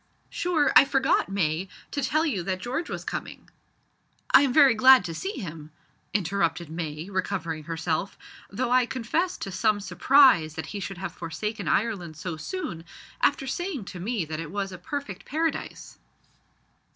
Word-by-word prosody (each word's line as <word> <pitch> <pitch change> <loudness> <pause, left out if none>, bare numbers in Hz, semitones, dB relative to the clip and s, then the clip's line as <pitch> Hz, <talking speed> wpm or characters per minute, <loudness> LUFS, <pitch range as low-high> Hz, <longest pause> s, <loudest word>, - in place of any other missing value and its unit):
"Sure, 340 -4 +1
I - - +10
forgot, 270 -5 +1
May, 185 -1 -1 0.2
to 285 - -2
tell 310 +5 +1
you 230 - -1
that 185 +2 -2
George 255 - -4
was - - -5
coming - - -6 0.4
" - - -44 0.3
"I - - +8
am 275 -3 +2
very 275 -1 +6
glad 255 -1 +7
to 165 - -4
see 385 - -4
him," 160 - -7 0.4
interrupted 175 -4 -1
May, 160 0 -5
recovering 170 -4 -3
herself, 165 +2 -2 0.3
"though 240 +4 -2
I 250 -1 +4
confess 265 +10 -1
to 195 - -6
some 210 +3 +1
surprise 205 - +4
that 160 - -4
he 205 - -3
should 195 0 -5
have 190 +2 -5
forsaken 205 +3 -5
Ireland 180 -4 -1
so 170 0 -4
soon, 170 - -5 0.4
after 270 - +2
saying 295 - -3
to 180 - -8
me 205 -1 -2
that 155 0 -5
it 165 -2 -5
was 195 +1 -3
a 185 - -9
perfect 285 +10 -5
paradise." 320 +2 -3
195 Hz, 165 wpm, -26 LUFS, 170-265 Hz, 0.4 s, I